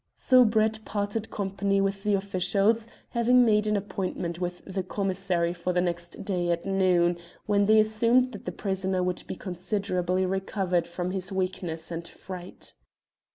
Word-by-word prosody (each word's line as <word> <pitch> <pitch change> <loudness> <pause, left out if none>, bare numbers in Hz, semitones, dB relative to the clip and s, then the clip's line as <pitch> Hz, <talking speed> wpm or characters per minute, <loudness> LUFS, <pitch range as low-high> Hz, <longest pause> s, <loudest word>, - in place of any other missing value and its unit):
So 255 -1 +5
Brett 220 -1 +1
parted 205 +1 -3
company 195 0 -1
with 195 0 0
the 205 0 +2
officials, 200 +3 +1 0.2
having 245 +1 +4
made 210 -1 +3
an 210 -1 +2
appointment 185 -3 -3
with 180 0 -4
the 190 0 -3
commissary 185 -2 -1
for 180 0 -2
the 180 - +2
next 175 0 -3
day 180 -3 -1
at 170 0 -1
noon, 180 -3 +2 0.3
when 200 -1 +2
they 215 0 +6
assumed 230 +4 +3
that 205 - -10
the 180 - -2
prisoner 190 0 -1
would 180 0 -1
be - - -4
considerably 185 -1 -1
recovered 190 -2 -1
from 175 +1 -3
his 185 0 -3
weakness 180 -3 -3
and 170 0 -4
fright. 180 0 -9
190 Hz, 155 wpm, -27 LUFS, 180-210 Hz, 0.3 s, they